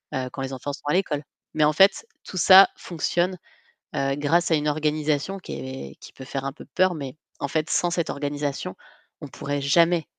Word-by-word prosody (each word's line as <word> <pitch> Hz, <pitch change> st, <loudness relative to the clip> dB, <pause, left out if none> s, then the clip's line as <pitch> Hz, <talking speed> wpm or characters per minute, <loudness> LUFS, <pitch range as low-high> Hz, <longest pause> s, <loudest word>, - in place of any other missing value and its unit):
heu, 130 Hz, -1 st, -2 dB
quand 135 Hz, -, -6 dB
les 135 Hz, 0 st, -4 dB
enfants 130 Hz, +2 st, -4 dB
sont 145 Hz, -, -10 dB
à 145 Hz, -, +2 dB
l'école. 155 Hz, -6 st, 0 dB, 0.3 s
Mais 155 Hz, -, +2 dB
en 150 Hz, -, +3 dB
fait, 195 Hz, -, +4 dB, 0.2 s
tout 185 Hz, -, -8 dB
ça 190 Hz, +2 st, +8 dB
fonctionne, 175 Hz, +2 st, -1 dB, 0.6 s
heu, 135 Hz, 0 st, 0 dB
grâce 165 Hz, +4 st, +2 dB
à -, -, +6 dB
une 150 Hz, 0 st, 0 dB
organisation 155 Hz, +4 st, -1 dB
qui -, -, -8 dB
est 130 Hz, 0 st, -7 dB
qui -, -, -13 dB
peut 130 Hz, -, -11 dB
faire 135 Hz, +1 st, -4 dB
un 135 Hz, -, -3 dB
peu -, -, -12 dB
peur 185 Hz, -1 st, +3 dB
mais 140 Hz, -2 st, -7 dB, 0.2 s
en 140 Hz, -, -3 dB
fait, 155 Hz, +2 st, -1 dB
sans 175 Hz, -, +1 dB
cette 170 Hz, -2 st, -1 dB
organisation, 145 Hz, 0 st, -3 dB, 0.5 s
on -, -, -6 dB
pourrait 145 Hz, 0 st, -4 dB
jamais 165 Hz, +3 st, +3 dB
150 Hz, 205 wpm, -24 LUFS, 140-175 Hz, 0.6 s, ça